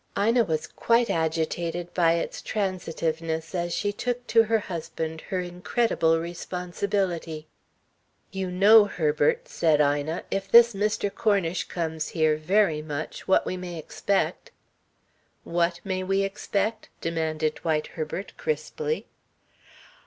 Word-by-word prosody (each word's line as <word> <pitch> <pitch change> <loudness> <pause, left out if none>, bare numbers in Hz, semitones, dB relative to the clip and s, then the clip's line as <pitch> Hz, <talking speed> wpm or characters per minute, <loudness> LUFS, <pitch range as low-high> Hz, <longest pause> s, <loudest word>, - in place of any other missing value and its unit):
Ina 230 +4 +3
was 155 -3 -1
quite 235 0 +1
agitated 165 +2 -1
by 165 -2 +4
its 170 - -3
transitiveness 165 -4 -2
as 175 -1 -1
she 205 +3 -1
took 245 +3 -3
to 230 - +5
her 225 +1 +3
husband 160 -4 -5
her 185 -3 0
incredible 175 -1 +1
responsibility. 175 -1 -3 0.9
"You 190 -1 -3
know, 205 +4 +7
Herbert," 205 - +1
said 160 - +2
Ina, 145 +3 +1
"if 195 0 -2
this 235 +2 +8
Mr. 205 0 -1
Cornish 195 -5 +1
comes 160 -2 -3
here 155 -2 +2
very 160 0 +2
much, 155 0 -6
what 190 - +4
we 185 - -3
may 180 -2 -6
expect." 200 - -1 0.9
"What 170 0 0
may 190 -2 -2
we 195 +1 +1
expect?" 200 +2 -2
demanded 160 -2 -1
Dwight 155 -2 0
Herbert, 160 +4 -5
crisply. 465 0 -2
175 Hz, 125 wpm, -26 LUFS, 160-200 Hz, 0.9 s, this